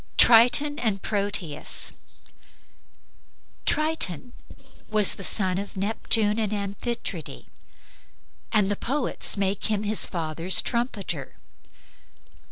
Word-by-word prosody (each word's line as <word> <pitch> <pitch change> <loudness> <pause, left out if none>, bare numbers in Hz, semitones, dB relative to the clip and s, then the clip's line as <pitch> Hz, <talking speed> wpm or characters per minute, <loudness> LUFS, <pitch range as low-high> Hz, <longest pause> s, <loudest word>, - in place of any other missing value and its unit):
TRITON 250 +6 +5
AND 215 -5 -2
PROTEUS 200 -7 -3 1.7
Triton 305 - -1 0.6
was 215 -2 +3
the 195 - -10
son 185 -1 0
of 200 -1 -8
Neptune 210 +1 +2
and 215 -2 -2
Amphitrite, 210 +4 -5 1.1
and 205 -2 +2
the - - 0
poets 265 -1 -1
make 195 0 -2
him 210 -1 -2
his 210 0 +5
father's 165 +1 +2
trumpeter. 200 - -3
205 Hz, 90 wpm, -24 LUFS, 195-230 Hz, 1.7 s, TRITON